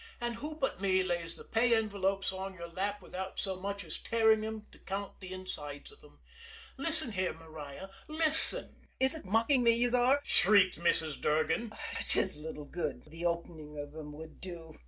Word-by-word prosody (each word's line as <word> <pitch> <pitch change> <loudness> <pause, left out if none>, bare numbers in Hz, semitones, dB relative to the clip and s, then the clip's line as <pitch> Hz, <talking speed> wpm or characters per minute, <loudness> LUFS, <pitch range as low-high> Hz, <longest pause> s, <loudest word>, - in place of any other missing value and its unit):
"And 240 -1 -3
who 300 +5 -5
but 270 - -2
me 190 -1 +3
lays 170 -2 -2
the - - -10
pay 235 +1 +3
envelopes 195 -3 0
on 190 0 -5
your 170 -1 -7
lap 200 +3 -3
without 190 +1 -6
so 190 -2 0
much 200 +1 -4
as - - -7
tearing 220 -1 +3
'em 220 -1 -5
to - - -16
count 200 +1 -5
the 185 -1 -9
insides 150 -6 -2
of 435 - -19
'em? - - -18 0.6
Listen 285 -3 +1
here, 185 -2 -1
Maria, 160 +1 -9 0.2
listen 315 0 +3
" - - -37
"Is 265 +2 +4
ut 320 - -6
mocking 230 +7 +3
me, 230 -1 +5
yez 240 +1 +1
are!" 250 +3 +4
shrieked 195 -4 +4
Mrs. 160 -3 +2
Durgan. 160 +9 +1 0.3
"'Tis 185 -6 +5
little 150 -1 -7
good 175 +4 -4
the 165 +2 -2
opening 160 -3 -4
av 145 +1 -7
'em 150 -2 -7
would 160 +1 -11
do! 170 -3 -7
190 Hz, 185 wpm, -32 LUFS, 165-230 Hz, 0.6 s, me